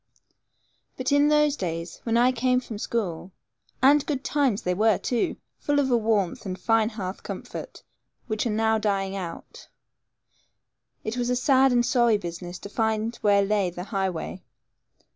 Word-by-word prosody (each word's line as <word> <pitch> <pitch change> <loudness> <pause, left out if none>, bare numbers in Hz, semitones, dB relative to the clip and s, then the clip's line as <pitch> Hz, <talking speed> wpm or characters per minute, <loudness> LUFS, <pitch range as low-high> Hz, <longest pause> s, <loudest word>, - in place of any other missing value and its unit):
But 255 +2 -2
in 285 +1 +5
those 300 -1 +3
days, 165 - -4
when 230 0 +2
I 245 +2 +5
came 250 +1 +2
from 225 -4 -8
school 190 -6 -3 0.5
(and 285 +2 +6
good 280 -3 -2
times 270 -8 +1
they 180 - 0
were, 215 +2 +3
too, 240 -2 -1 0.2
full 290 0 0
of 265 -2 +1
a - - +5
warmth 215 -6 0
and 185 -2 -5
fine 225 -1 +2
hearth 195 -4 -6
comfort, - - -8 0.4
which 220 +1 -1
now 220 0 +2
are - - -2
dying 195 -2 -1
out), 175 -4 -8 1.4
it 220 +3 -4
was 245 0 -1
a 250 - +2
sad 265 +1 +4
and 240 -1 +3
sorry 235 -4 +3
business 175 -1 -7
to - - -9
find 220 +1 -1
where 200 -1 +3
lay 200 -2 +1
the 175 +1 -7
highway. 190 -1 -2
220 Hz, 160 wpm, -25 LUFS, 195-250 Hz, 1.4 s, and